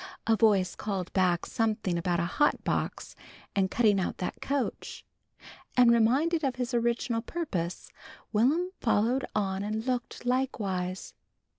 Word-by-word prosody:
A 225 - +4
voice 205 -4 +3
called 195 -4 -4
back 180 -3 +2
something 215 -5 -1
about 170 0 0
a 170 - +1
hot 295 +12 +1
box - - -2 0.4
and 190 -2 +2
cutting 210 -3 +3
out 185 - -2
that 180 - -4
coach, 280 -2 -3 0.7
and 245 -1 +7
reminded 275 +9 +3
of 265 -2 0
his 250 0 -3
original 235 0 0
purpose, 205 - -4 0.4
Will'm 295 - +2
followed 235 +3 +1
on 195 -2 0
and 215 +2 -3
looked, 250 -1 -3
likewise. 200 -8 -2
225 Hz, 135 wpm, -29 LUFS, 190-250 Hz, 0.7 s, and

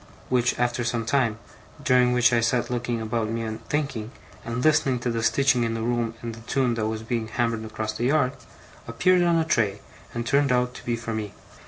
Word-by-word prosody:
which, 125 -1 +2
after 120 0 0
some 115 -1 -1
time, 115 -4 +1 0.5
during 125 -3 +4
which 120 -2 +4
I 120 - +4
sat 120 +2 0
looking 120 -1 -1
about 110 0 -2
me 115 +1 -2
and 110 -1 -5
thinking, 140 -7 -2 0.3
and 115 +3 -3
listening 135 -4 +3
to 120 - -1
the 115 0 -1
stitching 135 +1 +3
in 115 0 -1
the 115 - -3
room 120 -1 -1
and 115 -1 -4
the 115 - -11
tune 125 +1 0
that 110 -2 -1
was 110 0 -3
being 115 -1 -2
hammered 115 0 -1
across 110 0 -4
the 120 - -2
yard, 130 -1 +3 0.6
appeared 180 +11 +3
on 170 -1 +3
a 165 -1 +2
tray, 105 -9 +1 0.3
and 120 0 -4
turned 140 0 +2
out 125 0 +1
to - - -11
be 120 - 0
for 115 0 -5
me. 105 -2 -4
120 Hz, 215 wpm, -25 LUFS, 115-125 Hz, 0.6 s, during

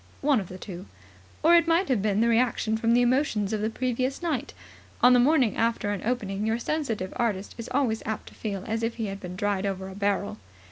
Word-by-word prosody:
One 280 -3 +3
of 190 - -5
the 185 - -8
two. 185 0 -8 0.6
Or 330 +2 +6
it 335 -1 +4
might 335 +3 +3
have 250 -7 +1
been 210 0 +1
the 230 - +3
reaction 230 -1 +2
from 230 +1 +2
the 245 - +4
emotions 240 -5 +1
of 215 - -1
the 215 - 0
previous 255 +5 -2
night. 295 -5 -2 0.5
On 250 +1 +8
the 250 - +6
morning 260 -3 +3
after 230 -2 0
an 205 - -3
opening 210 -4 -2
your 220 +1 +1
sensitive 235 -8 -2
artist 210 -5 -1
is 230 - -6
always 250 -5 +1
apt 220 0 -4
to - - -19
feel 200 -4 -4
as 225 +1 -2
if 230 0 -1
he 225 - -3
had 195 -1 -5
been 180 -1 -7
dried 200 0 -1
over 190 -1 -4
a 190 - -9
barrel. 200 - -1
225 Hz, 230 wpm, -26 LUFS, 200-250 Hz, 0.6 s, On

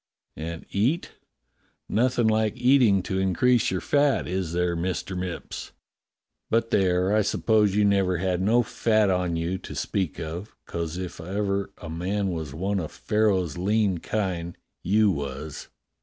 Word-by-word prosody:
i.\nd 80 +1 -6
eat; 125 - 0 0.8
nothing 120 +1 +2
like 110 +1 +1
eating 125 -6 +4
to 95 +1 -2
increase 120 +6 +3
your 95 - -1
fat, 145 +4 +2
is 90 -2 -2
there. 90 0 0
Mister 95 +2 -3
Mipps? 90 -1 -5 0.8
But, 115 0 +1
there, 95 +1 +2
I 110 - +4
suppose 105 -1 +2
you 105 0 +4
never 95 -3 +2
had 90 0 0
no 115 +5 +3
fat 110 -3 +2
on 90 -2 0
you 85 +3 -2
to - - -9
speak 95 -6 -2
of, 85 +5 -6
'cos 85 0 -4
if 90 -2 -6
ever 100 +2 -1
a 85 - -8
man 95 +4 -1
was 80 -4 -4
one 95 +6 -1
of 80 -4 -5
Pharaoh's 95 -7 0
lean 100 -1 +1
kine, 90 -5 -2 0.3
you 105 +3 +3
was." 70 -1 -5
95 Hz, 150 wpm, -26 LUFS, 85-105 Hz, 0.8 s, eating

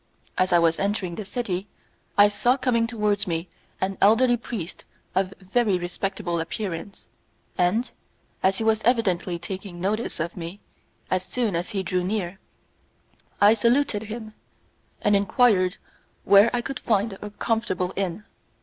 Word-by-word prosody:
As 185 0 +1
I 175 - +6
was 165 -1 +3
entering 200 -3 -1
the 210 - -5
city, 195 -3 -3 0.5
I 205 0 +8
saw 240 +5 +2
coming 235 -3 +1
towards 210 -4 0
me 165 +1 -2 0.3
an 190 0 -2
elderly 240 +4 +5
priest 220 -7 -6 0.3
of 190 +1 +1
very 195 +1 +1
respectable 175 0 -3
appearance, 185 +2 -5 0.5
and, 190 +7 +1 0.5
as 190 0 +2
he - - -1
was 220 -1 +2
evidently 195 -7 +1
taking 185 0 -7
notice 210 +4 -1
of 170 +2 -3
me, 175 +3 -7 0.5
as 185 - +2
soon 225 -1 -1
as 170 +2 -2
he 200 -4 -2
drew 185 -1 -1
near, 190 -1 -2 1.0
I 205 +2 +7
saluted 235 0 +2
him, 220 -1 -7 0.7
and 205 - +4
enquired 200 -2 +3 0.5
where 200 +3 +7
I 245 - 0
could 270 +2 -5
find 210 -1 +1
a 210 - -5
comfortable 205 -4 -1
inn. 195 +1 -2
200 Hz, 145 wpm, -25 LUFS, 180-225 Hz, 1.0 s, I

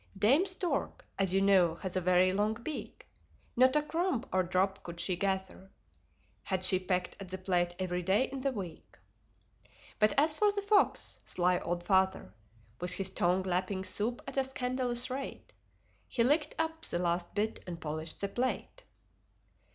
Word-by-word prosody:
Dame 270 - +4
Stork, 360 -6 -3
as 195 -2 +2
you 195 +1 +2
know, 185 -4 +4
has 185 +1 -6
a 185 - +1
very 185 +1 +4
long 210 +2 +1
beak: 235 +7 -7 0.5
Not 255 +2 +5
a 300 - +3
crumb 325 -4 -1
or 185 - +4
drop 185 +2 0
could 170 0 -8
she 180 +1 +1
gather 190 0 -2 0.7
Had 185 -1 -1
she 185 0 +4
pecked 180 -1 -1
at 195 -2 -8
the 190 - -4
plate 175 -2 0
every 180 -1 -2
day 190 +7 +3
in 265 0 -5
the 275 +1 +1
week. 185 -9 -8 1.0
But 215 -1 +4
as 305 +2 +4
for 415 +6 +3
the 405 0 -3
Fox 410 0 +2
sly 180 0 +1
old 175 0 -3
Father: 190 - +1 0.5
With 180 +1 0
his 190 -1 0
tongue 180 +2 +1
lapping 185 +1 -1
soup 225 +5 -1
at - - -7
a 270 - +4
scandalous 255 -1 -1
rate, 270 +1 -6 0.5
He 235 - +1
licked 295 +5 +2
up 320 0 -2
the - - -2
last 175 0 -1
bit 215 +2 -1
and 170 -2 -5
polished 155 +1 -4
the 200 - 0
plate. 255 - -3
195 Hz, 170 wpm, -31 LUFS, 180-255 Hz, 1.0 s, Not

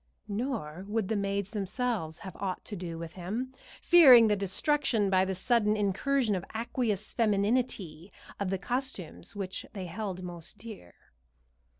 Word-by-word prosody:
Nor 205 - -3
would 215 -2 -1
the 220 - +1
maids 200 0 -1
themselves 205 -5 -2
have 190 - -7
aught 190 -2 -3
to 210 - -6
do 170 -3 -5
with 165 0 -7
him, 220 +9 -4 0.3
fearing 260 -10 +9
the 210 - +3
destruction 205 +2 +1
by 185 0 +4
the 190 0 -2
sudden 215 +1 +2
incursion 215 +4 +1
of 185 -3 -2
aqueous 220 -3 -1
femininity 205 -5 0 0.3
of 200 -2 -1
the 195 - 0
costumes 245 - -4
which 190 -2 -4
they 195 -3 -5
held 185 +1 -5
most 175 +2 -8
dear. 210 - -11
200 Hz, 150 wpm, -30 LUFS, 185-230 Hz, 0.3 s, fearing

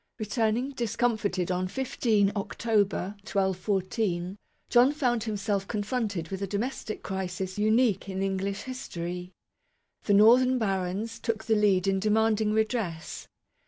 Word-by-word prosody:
Returning, 225 +3 0
discomfited, 220 -7 -1
on 185 0 0
15 215 -2 +1
October, 205 -1 0
1214, 190 -1 -1 0.3
John 245 +3 +5
found 245 -7 0
himself 200 -2 -1
confronted 205 -5 -2
with 190 0 -5
a 195 - -1
domestic 215 +2 -4
crisis 190 0 -4
unique 215 -2 +2
in 190 0 -2
English 195 +1 -2
history. 180 -8 -6 0.7
The 205 - +4
northern 250 +5 +6
barons 200 +1 -2
took 225 -1 -2
the 220 0 +1
lead 205 -4 +3
in 195 0 +2
demanding 215 +1 +2
redress. 215 -7 -2
210 Hz, 120 wpm, -28 LUFS, 190-225 Hz, 0.7 s, northern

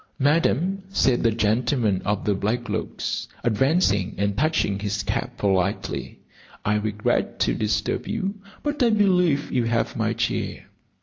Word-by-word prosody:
"Madam," 165 +6 +2
said 130 -10 +2
the 115 - +4
gentleman 110 -1 +1
of 105 -1 -1
the 105 - +2
black 110 +5 -1
looks, - - -3 0.2
advancing 115 - +2
and 100 0 0
touching 150 -9 +1
his 100 0 -2
cap 120 +4 -3
politely, 100 0 -1 0.5
"I 105 - +2
regret 105 0 -1
to - - +3
disturb 105 - -1
you, 200 -3 -2 0.3
but 295 -1 -2
I 240 - +5
believe 180 -9 +2
you 125 -2 +1
have 115 0 0
my - - 0
chair." - - -2
115 Hz, 140 wpm, -24 LUFS, 105-160 Hz, 0.5 s, I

